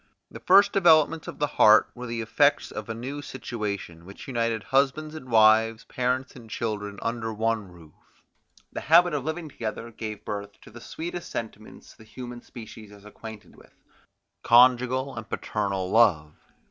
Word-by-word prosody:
The - - -9
first 200 +2 +5
developments 165 -4 +4
of - - -7
the 150 - +1
heart 110 -6 +5
were 125 0 -8
the 115 0 -3
effects 145 +6 +2
of 105 +1 -7
a 115 - -3
new 135 +5 -6
situation, 105 -11 -6
which 100 +3 -12
united 115 -4 -1
husbands 140 +6 0
and 155 -5 -10
wives, 110 0 +4
parents 125 +1 -2
and 115 -4 -13
children, 105 -2 -4
under 115 -1 -3
one 110 -3 -2
roof; 80 -3 -16 0.8
the - - -5
habit 175 +2 +5
of 145 -3 -2
living 160 +2 -4
together 115 -3 -6
gave 110 -2 -7
birth 100 0 -6
to - - -15
the 120 +2 -12
sweetest 175 +5 -7
sentiments 110 -2 -8
the - - -17
human 120 +1 -9
species 110 -3 -12
is 100 0 -16
acquainted 110 0 -11
with, - - -20 0.7
conjugal 125 +2 +4
and 110 -1 -8
paternal 100 -3 -3
love. 85 -10 +3
115 Hz, 160 wpm, -26 LUFS, 105-135 Hz, 0.8 s, first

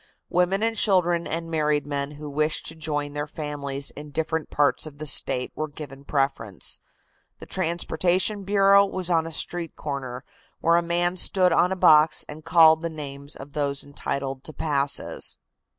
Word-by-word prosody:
Women 180 +4 +2
and 225 0 +1
children 175 -5 +2
and 165 0 -4
married 150 -2 +1
men 140 0 -3
who 150 +1 -9
wished 150 +2 -1
to 160 - -4
join 145 -2 -3
their 145 +1 -3
families 145 -2 -4
in 150 +1 -9
different 160 +1 -2
parts 145 +1 +1
of 145 -2 -11
the 155 - -6
State 125 -2 +2
were 155 - -3
given 140 -2 -10
preference. 135 -9 -2 0.6
The - - -11
transportation 180 +3 0
bureau 200 0 +5
was 185 -2 -1
on 165 -1 +2
a - - -7
street 170 +1 -2
corner, 130 -4 -5 0.4
where 170 +1 +3
a - - +3
man 175 +1 0
stood 185 -1 +4
on 180 +2 +3
a - - 0
box 155 -3 +5
and 155 +1 -9
called 160 -1 +6
the 170 - -2
names 140 -2 -7
of 140 +1 -11
those 140 -2 -1
entitled 140 -1 -4
to 155 - -7
passes. 145 -3 -1
155 Hz, 170 wpm, -25 LUFS, 145-170 Hz, 0.6 s, called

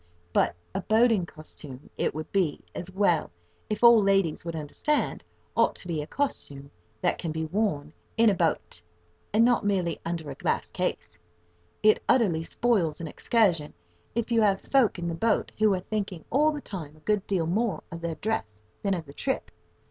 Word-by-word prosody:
But - - +2 0.2
a 195 - -2
"boating 220 -3 +3
costume," 150 -4 -11
it - - -1
would 155 0 -6
be 180 -7 +1
as 175 - -4
well 185 -3 +2 0.4
if 215 +2 -3
all 235 -2 +9
ladies 195 -5 +2
would 170 -1 -5
understand, 160 - -1 0.3
ought - - +3
to - - -9
be 160 -3 -1
a 150 - -7
costume 140 - -3 0.3
that - - +1
can 165 - -3
be 160 0 -2
worn 155 -5 -1 0.2
in 230 0 +5
a 210 - +6
boat, 165 - -1 0.5
and 220 +3 +5
not 245 0 +3
merely 185 -5 0
under 165 -3 -4
a - - -4
glass - - -1
case. 85 0 -3 0.6
It 215 0 +5
utterly 180 -10 +3
spoils 180 -6 +1
an 165 - -5
excursion 175 -5 +1 0.4
if 235 0 -1
you 230 -1 +4
have 200 -2 +3
folk 265 -8 +2
in 175 -1 -3
the 170 - -2
boat 220 +6 +1
who 215 -1 +5
are - - -2
thinking 195 -4 -4
all 300 +4 +4
the 295 -1 -5
time 160 - -7
a - - -21
good 210 +2 0
deal 185 -5 +1
more 205 +5 0
of 170 0 -7
their 170 -1 -3
dress 110 - -3 0.2
than 200 -2 +1
of 165 -3 -5
the 140 - -12
trip. 265 - -2
185 Hz, 185 wpm, -27 LUFS, 160-215 Hz, 0.6 s, all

